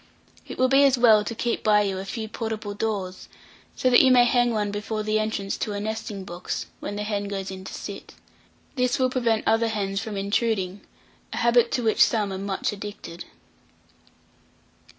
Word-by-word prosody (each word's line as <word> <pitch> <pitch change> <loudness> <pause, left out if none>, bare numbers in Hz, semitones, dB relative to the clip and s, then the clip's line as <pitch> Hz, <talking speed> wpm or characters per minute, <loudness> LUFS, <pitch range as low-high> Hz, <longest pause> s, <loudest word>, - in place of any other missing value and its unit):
It - - -7
will 255 - +4
be 270 +2 +5
as 270 -2 +4
well 220 -3 +6
to 230 +2 -5
keep 235 +1 -2
by 210 -1 +4
you 195 -2 -2
a 190 - -6
few 220 +3 -5
portable 220 -2 -4
doors, 200 -3 -4 0.5
so - - 0
that 245 - +8
you 265 - +5
may 245 -1 +6
hang 245 0 +3
one 210 -3 -1
before 210 +1 -3
the 215 0 +1
entrance 215 -2 -2
to 210 - -3
a 205 - -3
nesting 215 -2 -4
box, 180 -1 -5
when 205 - -5
the 210 - -3
hen 205 -1 -2
goes 195 -1 -4
in 190 0 -8
to - - -7
sit. - - -8 0.6
This 250 -2 +1
will 255 -1 +1
prevent 235 -4 +1
other 225 +1 +3
hens 200 -3 -2
from 220 -2 -5
intruding, 200 -1 -1 0.5
a - - -5
habit 235 0 +3
to 245 - 0
which 220 -1 +5
some 210 -4 0
are 190 - -4
much 195 -1 -2
addicted. 200 -4 -8
215 Hz, 190 wpm, -25 LUFS, 200-230 Hz, 0.6 s, that